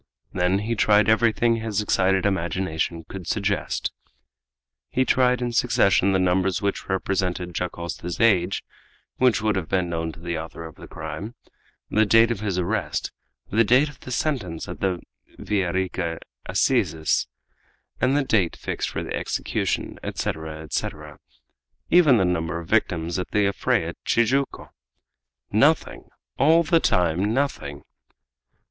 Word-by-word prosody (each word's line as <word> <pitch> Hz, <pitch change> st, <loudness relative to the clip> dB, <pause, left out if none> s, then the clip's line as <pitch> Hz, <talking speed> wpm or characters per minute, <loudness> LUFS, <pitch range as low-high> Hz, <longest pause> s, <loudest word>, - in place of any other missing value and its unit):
Then 90 Hz, +2 st, +2 dB
he 115 Hz, -, 0 dB
tried 105 Hz, -2 st, +4 dB
everything 115 Hz, +1 st, +3 dB
his 110 Hz, -2 st, -2 dB
excited 95 Hz, -2 st, +2 dB
imagination 85 Hz, -3 st, -1 dB
could 95 Hz, -4 st, -8 dB
suggest. 100 Hz, -2 st, -1 dB, 1.0 s
He 130 Hz, -, +1 dB
tried 125 Hz, 0 st, +3 dB
in 120 Hz, -, -1 dB
succession 120 Hz, -5 st, +3 dB
the 95 Hz, -, +3 dB
numbers 90 Hz, 0 st, +1 dB
which 100 Hz, 0 st, -3 dB
represented 90 Hz, -2 st, -1 dB
Dacosta's 85 Hz, 0 st, -4 dB
age, 95 Hz, -5 st, +3 dB, 0.5 s
which 125 Hz, -4 st, +3 dB
would 105 Hz, -2 st, +2 dB
have 90 Hz, -4 st, -3 dB
been 90 Hz, -2 st, 0 dB
known 80 Hz, -1 st, -2 dB
to -, -, -14 dB
the 85 Hz, -1 st, -3 dB
author 80 Hz, +1 st, -8 dB
of 80 Hz, -, -9 dB
the -, -, -12 dB
crime, 80 Hz, +9 st, -7 dB, 0.6 s
the 110 Hz, 0 st, +3 dB
date 115 Hz, +2 st, +5 dB
of 115 Hz, -, -2 dB
his 100 Hz, -4 st, -2 dB
arrest, 90 Hz, -1 st, -1 dB, 0.4 s
the 115 Hz, +3 st, +4 dB
date 130 Hz, +7 st, +4 dB
of 145 Hz, -, -15 dB
the -, -, -10 dB
sentence 120 Hz, -, -2 dB
at -, -, -7 dB
the 95 Hz, -3 st, -1 dB, 0.3 s
Villa 95 Hz, -4 st, -1 dB
Rica 90 Hz, -3 st, -2 dB, 0.3 s
assizes, 80 Hz, -1 st, +1 dB, 0.7 s
the 135 Hz, +3 st, +2 dB
date 100 Hz, -10 st, +1 dB
fixed -, -, -3 dB
for -, -, -4 dB
the -, -, -5 dB
execution, -, -, -2 dB
etc., 80 Hz, 0 st, -4 dB
etc., 75 Hz, -1 st, -5 dB, 0.7 s
even 160 Hz, -8 st, +6 dB
the 95 Hz, -, +3 dB
number 85 Hz, -2 st, -1 dB
of 85 Hz, -1 st, -7 dB
victims 85 Hz, -5 st, 0 dB
at 90 Hz, -, -4 dB
the 105 Hz, -1 st, +2 dB
affray 100 Hz, -, +1 dB
at -, -, -9 dB
Tijuco! 130 Hz, +4 st, 0 dB, 0.8 s
Nothing! -, -, +2 dB, 0.3 s
All 160 Hz, +4 st, +5 dB
the 165 Hz, 0 st, +3 dB
time 90 Hz, -, +1 dB
nothing! 100 Hz, -, -2 dB
95 Hz, 140 wpm, -24 LUFS, 85-115 Hz, 1.0 s, even